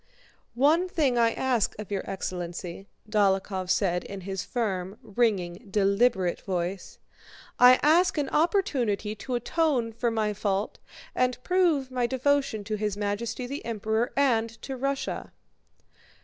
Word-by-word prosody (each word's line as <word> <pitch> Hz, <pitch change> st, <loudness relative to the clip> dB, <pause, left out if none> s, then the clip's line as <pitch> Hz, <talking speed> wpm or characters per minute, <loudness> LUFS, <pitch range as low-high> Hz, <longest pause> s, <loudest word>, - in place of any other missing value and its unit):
"One 315 Hz, +8 st, +3 dB
thing 280 Hz, -9 st, +1 dB
I 230 Hz, -1 st, +4 dB
ask 250 Hz, -5 st, 0 dB
of 210 Hz, -1 st, -8 dB
your 195 Hz, -, -1 dB
excellency," 180 Hz, 0 st, -5 dB, 0.2 s
Dólokhov 195 Hz, -3 st, +1 dB
said 180 Hz, -3 st, +1 dB
in 195 Hz, -1 st, -8 dB
his 190 Hz, 0 st, -4 dB
firm, 195 Hz, -5 st, -3 dB
ringing, 205 Hz, -3 st, -1 dB
deliberate 195 Hz, -2 st, +2 dB
voice. 185 Hz, 0 st, -4 dB, 0.6 s
"I 250 Hz, +1 st, +8 dB
ask 340 Hz, +4 st, +4 dB
an 290 Hz, -2 st, 0 dB
opportunity 265 Hz, -, +1 dB
to 245 Hz, +4 st, -4 dB
atone 245 Hz, -2 st, 0 dB
for 235 Hz, +1 st, 0 dB
my 215 Hz, -2 st, 0 dB
fault 200 Hz, 0 st, -2 dB, 0.3 s
and 255 Hz, 0 st, +1 dB
prove 335 Hz, -8 st, +2 dB
my 250 Hz, -2 st, 0 dB
devotion 265 Hz, -4 st, 0 dB
to 215 Hz, +1 st, -3 dB
His 210 Hz, -1 st, -2 dB
Majesty 210 Hz, +4 st, -2 dB
the 280 Hz, +4 st, -5 dB
Emperor 225 Hz, +1 st, -1 dB
and 235 Hz, -5 st, +3 dB
to 270 Hz, -, -4 dB
Russia!" 275 Hz, +1 st, -3 dB
225 Hz, 135 wpm, -27 LUFS, 195-260 Hz, 0.6 s, I